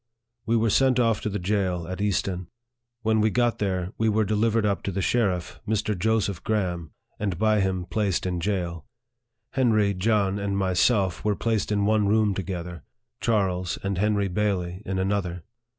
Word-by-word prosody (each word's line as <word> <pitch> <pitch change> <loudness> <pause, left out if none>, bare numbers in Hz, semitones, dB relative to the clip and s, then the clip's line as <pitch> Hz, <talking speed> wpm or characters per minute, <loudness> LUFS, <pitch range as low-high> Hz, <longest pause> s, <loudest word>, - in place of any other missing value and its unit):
We 115 +1 +3
were 115 -1 +2
sent 130 +1 +3
off 115 -3 +2
to - - -2
the 105 - -2
jail 90 -3 -1
at 95 +2 -5
Easton. 95 -3 -1 0.6
When 110 0 +2
we 110 - +3
got 120 +1 +1
there, 95 -3 -1
we 110 0 +3
were 110 0 +2
delivered 110 +1 +1
up 100 -4 0
to 100 - -3
the 95 - -3
sheriff, 95 -8 0
Mr. 110 0 0
Joseph 100 -2 0
Graham, 90 -6 -1 0.3
and 100 -4 -2
by 110 +2 +3
him 95 -2 0
placed 100 -3 -1
in 90 -1 -1
jail. 85 -4 -2 0.6
Henry, 110 -6 +2
John, 100 0 +1
and 100 -1 -1
myself, 95 0 +2
were 105 -1 +1
placed 110 -1 -1
in 100 -1 +1
one 105 -1 +3
room 105 -1 +3
together 90 -3 -5 0.4
Charles, 95 -5 0
and 95 -2 -1
Henry 105 -1 +2
Bailey, 95 -2 -1
in 95 0 -1
another. 95 -3 -1
100 Hz, 170 wpm, -25 LUFS, 90-110 Hz, 0.6 s, We